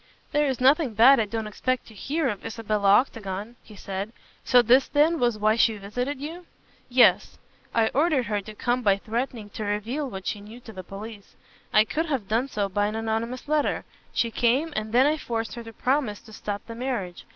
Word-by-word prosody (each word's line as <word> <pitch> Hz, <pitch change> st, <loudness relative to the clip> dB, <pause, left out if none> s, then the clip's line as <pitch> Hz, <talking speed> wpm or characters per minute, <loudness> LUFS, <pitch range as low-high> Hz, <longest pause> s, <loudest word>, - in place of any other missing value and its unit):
"There 295 Hz, 0 st, +2 dB
is 265 Hz, -3 st, -1 dB
nothing 265 Hz, -2 st, +3 dB
bad 250 Hz, +5 st, +7 dB
I 220 Hz, -, +2 dB
don't 225 Hz, +1 st, -4 dB
expect 255 Hz, +4 st, -2 dB
to 220 Hz, -, -14 dB
hear 285 Hz, -, -1 dB
of 210 Hz, -5 st, -3 dB
Isabella 215 Hz, -3 st, -1 dB
Octagon," 210 Hz, -1 st, 0 dB
he 215 Hz, -, -15 dB
said, 195 Hz, +2 st, -5 dB, 0.3 s
"so 245 Hz, -1 st, +5 dB
this 255 Hz, +4 st, +5 dB
then 305 Hz, +3 st, +3 dB
was 240 Hz, -3 st, +1 dB
why 215 Hz, +1 st, +3 dB
she 225 Hz, -1 st, +3 dB
visited 245 Hz, +8 st, -4 dB
you?" 330 Hz, +5 st, -7 dB, 0.4 s
"Yes. 245 Hz, 0 st, +4 dB, 0.3 s
I 225 Hz, -1 st, +2 dB
ordered 290 Hz, -3 st, +2 dB
her 205 Hz, -1 st, -1 dB
to 215 Hz, +2 st, -11 dB
come 245 Hz, +3 st, 0 dB
by 200 Hz, -4 st, +3 dB
threatening 225 Hz, 0 st, -4 dB
to 215 Hz, -, -5 dB
reveal 225 Hz, +8 st, -2 dB
what 190 Hz, -4 st, -8 dB
she 205 Hz, -, -3 dB
knew 215 Hz, +4 st, -11 dB
to 225 Hz, -2 st, -11 dB
the 185 Hz, -1 st, -8 dB
police. 200 Hz, +2 st, -10 dB, 0.4 s
I 215 Hz, -, +6 dB
could 320 Hz, +7 st, -2 dB
have 265 Hz, -10 st, -2 dB
done 230 Hz, +5 st, +1 dB
so 210 Hz, -6 st, -1 dB
by 205 Hz, +2 st, 0 dB
an 215 Hz, -, -4 dB
anonymous 225 Hz, +3 st, -3 dB
letter. 300 Hz, 0 st, 0 dB, 0.3 s
She 230 Hz, -, 0 dB
came 260 Hz, +8 st, +1 dB
and 215 Hz, 0 st, -3 dB
then 250 Hz, +3 st, +5 dB
I 305 Hz, +2 st, +2 dB
forced 225 Hz, -5 st, -3 dB
her 235 Hz, -, -7 dB
to 225 Hz, -, -10 dB
promise 250 Hz, -3 st, 0 dB
to 220 Hz, -, -15 dB
stop 205 Hz, -1 st, -5 dB
the 230 Hz, -, -8 dB
marriage. 230 Hz, -8 st, -4 dB
230 Hz, 205 wpm, -25 LUFS, 210-260 Hz, 0.4 s, bad